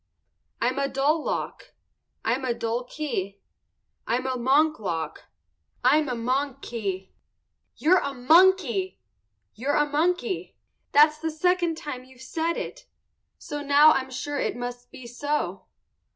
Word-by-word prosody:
_ - - -53 0.6
I'm 255 +3 0
a 275 - +1
dull 290 +4 +1
lock. - - -4 0.5
I'm 250 +4 0
a 245 -2 0
dull 230 +2 -2
key. 235 -9 -4 0.7
I'm 245 +3 0
a 260 -1 -1
monk 285 +6 +3
lock. 170 -6 -4 0.6
I'm 290 +3 +4
a 250 - -1
monk 265 +3 -1
key. 195 -5 -4 0.7
You're 360 +4 +4
a 280 - -3
monkey! 370 +8 +3 0.5
You're 270 +6 -1
a 295 - +4
monkey. 355 +7 -1 0.3
That's 300 +1 +5
the 320 +1 -2
second 345 +1 +1
time 260 -5 -6
you've 260 -1 -18
said 325 +5 -1
it, - - -6 0.5
so 295 0 -6
now 290 +2 +6
I'm 265 -3 0
sure 280 +3 -4
it - - -1
must 245 0 -6
be 255 - -12
so. 290 +5 -3
280 Hz, 140 wpm, -26 LUFS, 245-310 Hz, 0.7 s, now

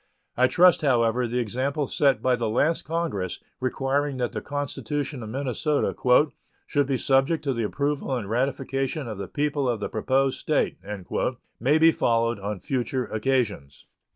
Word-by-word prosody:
I 125 +1 +4
trust, 180 +4 +5
however, 120 -3 +2
the 120 +2 -2
example 130 +6 -1
set 140 -1 +2
by 130 -1 +3
the 115 -2 -2
last 150 +9 +1
Congress, 155 - -2 0.2
requiring 135 +2 -1
that 125 -1 -1
the - - -4
constitution 145 -1 -3
of 110 - -7
Minnesota 140 +4 -1 0.7
"should 145 -2 +1
be 135 -2 +1
subject 135 +6 +2
to 140 -3 0
the 115 - -2
approval 140 +4 -1
and 115 -6 -4
ratification 135 +4 -1
of 110 -3 -6
the 100 - -4
people 145 -2 -1
of 120 -3 -1
the 100 - -3
proposed 130 +4 +1
State," - - 0 0.8
may 140 +7 +3
be 165 +1 +6
followed 115 -5 +1
on 100 0 -4
future 130 +1 -1
occasions. 110 - -2
130 Hz, 155 wpm, -25 LUFS, 115-145 Hz, 0.8 s, be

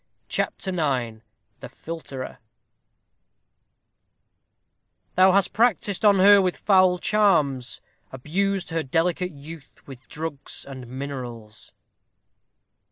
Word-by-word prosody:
CHAPTER 190 - -2
IX 130 -10 -2 0.4
THE - - -9
PHILTER 135 -1 -8 2.7
Thou 185 +1 +5
hast 195 0 +2
practised 215 -3 +1
on 205 -2 +5
her 200 +1 +7
with 185 -2 -1
foul 185 -2 +4
charms 155 - +1 0.3
Abused 185 +8 -2
her 165 0 0
delicate 165 +5 0
youth 150 -1 -12
with 130 -2 -13
drugs 155 -3 -6
and 130 -3 -9
minerals. 125 -4 -8
165 Hz, 95 wpm, -24 LUFS, 130-190 Hz, 2.7 s, her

